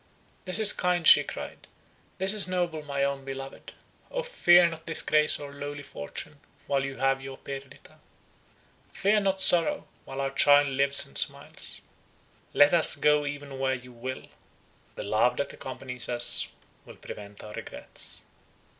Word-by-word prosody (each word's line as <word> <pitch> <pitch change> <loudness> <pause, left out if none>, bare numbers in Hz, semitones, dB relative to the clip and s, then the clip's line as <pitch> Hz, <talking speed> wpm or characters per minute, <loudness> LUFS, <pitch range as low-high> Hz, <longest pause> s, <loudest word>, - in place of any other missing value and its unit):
"This 185 0 +2
is 215 -2 +8
kind," 180 -2 -1
she - - +8
cried; - - -9 0.5
"this 190 +2 +1
is 210 -3 +3
noble, 175 -4 -3
my 140 -2 -3
own 140 -1 -2
beloved! 135 0 -9 0.4
O - - -4
fear 180 - +4
not 165 -1 -9
disgrace 155 -1 +3
or 140 -1 -9
lowly 145 0 -8
fortune, 140 - -9 0.3
while 140 -1 -1
you 135 0 -6
have 135 +1 0
your 135 0 -9
Perdita; 135 -1 -11 0.9
fear 210 +2 +1
not 195 -1 -1
sorrow, 175 -3 +4 0.2
while 135 0 -8
our 135 0 -2
child 145 +1 +4
lives 140 +1 +3
and 70 - -4
smiles. - - -3 0.7
Let 145 +2 +4
us 165 -2 +6
go 150 -1 +1
even 145 -2 -8
where 130 0 0
you 125 0 -12
will; 130 +2 -8 0.7
the - - -6
love 110 +4 0
that 140 - -4
accompanies 125 -2 -6
us 120 0 +3 0.4
will - - -14
prevent 100 -1 -11
our 105 - -10
regrets." - - -8
140 Hz, 155 wpm, -26 LUFS, 135-165 Hz, 0.9 s, is